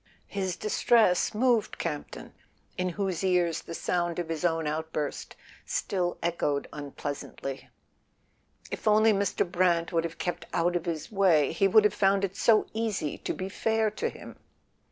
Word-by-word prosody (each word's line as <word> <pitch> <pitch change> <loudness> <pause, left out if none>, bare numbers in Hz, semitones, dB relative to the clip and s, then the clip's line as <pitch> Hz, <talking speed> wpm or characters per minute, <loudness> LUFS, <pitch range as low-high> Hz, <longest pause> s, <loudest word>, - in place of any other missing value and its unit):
His 190 -3 -2
distress 215 -3 +3
moved 235 -1 +2
Campton, 150 -4 -5 0.4
in 185 0 -1
whose 190 -1 -2
ears 175 -3 +2
the 165 - -8
sound 175 -1 -1
of 175 -2 -3
his 165 0 -3
own 165 -2 +1
outburst 155 -1 -3 0.3
still 180 -2 -1
echoed 155 -4 0
unpleasantly. 140 -1 -6 1.0
If - - -5
only 215 +1 +5
Mr. 200 -1 0
Brant 175 -1 +1
would 165 -1 +2
have 165 -1 -5
kept 175 -2 -4
out 175 +1 +1
of 175 0 -1
his 160 0 -4
way 180 -8 +4
he 195 +4 +2
would 215 +2 +6
have 210 -1 +3
found 195 0 +3
it 195 0 -7
so 220 0 +4
easy 215 -9 -2
to - - -3
be 185 - -4
fair 220 +2 0
to 215 - -2
him! - - -11
180 Hz, 155 wpm, -28 LUFS, 165-200 Hz, 1.0 s, would